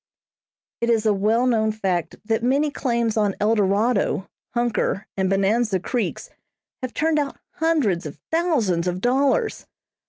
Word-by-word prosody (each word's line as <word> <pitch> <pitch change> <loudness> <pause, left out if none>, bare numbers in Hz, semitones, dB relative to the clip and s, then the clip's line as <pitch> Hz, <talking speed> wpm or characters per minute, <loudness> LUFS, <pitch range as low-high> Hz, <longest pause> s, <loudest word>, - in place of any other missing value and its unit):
It 235 - 0
is 225 -2 +2
a 215 - +4
well 215 +5 +2
known 220 -3 +2
fact 185 -6 -2
that 225 +1 0
many 280 +5 +2
claims 235 -5 -1
on 205 -2 +1
Eldorado, 205 -1 +1 0.3
Hunker 235 -4 0
and 190 -1 0
Bonanza 195 +1 +2
Creeks 235 +5 -3 0.5
have 255 -1 -5
turned 315 0 +2
out 280 -2 -3 0.2
hundreds 275 - +1
of 145 - -9
thousands 250 - +1
of 180 0 -1
dollars. 270 - +1
225 Hz, 135 wpm, -23 LUFS, 195-255 Hz, 0.5 s, a